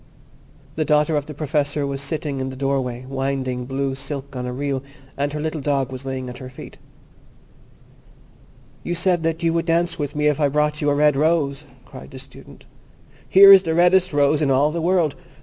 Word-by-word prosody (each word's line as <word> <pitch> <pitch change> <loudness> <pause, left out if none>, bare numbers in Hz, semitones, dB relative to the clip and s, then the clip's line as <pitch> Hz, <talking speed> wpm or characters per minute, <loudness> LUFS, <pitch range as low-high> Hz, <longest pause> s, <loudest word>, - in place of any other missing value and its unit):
The 155 - +1
daughter 150 +1 +2
of 145 -1 -2
the 150 - -8
Professor 145 -1 -1
was 140 0 -3
sitting 140 -1 -3
in 130 0 -3
the 130 - -8
doorway 130 -2 -2
winding 135 -2 -3
blue 135 +1 -2
silk 135 0 -6
on 125 0 -4
a - - -4
reel, 135 +1 -3 0.3
and 145 +1 -2
her 150 - -4
little 155 0 -3
dog 135 -2 -1
was 130 +1 -7
lying 130 -1 -4
at 125 0 -8
her 130 - -8
feet. 130 - -12 2.0
"You 175 - -3
said 175 0 +1
that 165 +1 -2
you 165 -1 +2
would 165 0 -1
dance 170 +1 0
with 145 -1 -4
me 150 0 -1
if 150 -1 +2
I 145 - +3
brought 150 +1 0
you 145 - +1
a 145 - +1
red 150 0 +3
rose," 150 -1 0 0.2
cried - - -12
the 135 - -11
Student. 135 +1 -14 0.6
"Here 195 +1 +9
is 195 - +8
the 165 -3 -2
reddest 180 +2 +3
rose 145 +1 +2
in 145 - +1
all 140 +3 +3
the 170 +1 -3
world. 170 -4 +1
145 Hz, 200 wpm, -21 LUFS, 135-160 Hz, 2.0 s, Here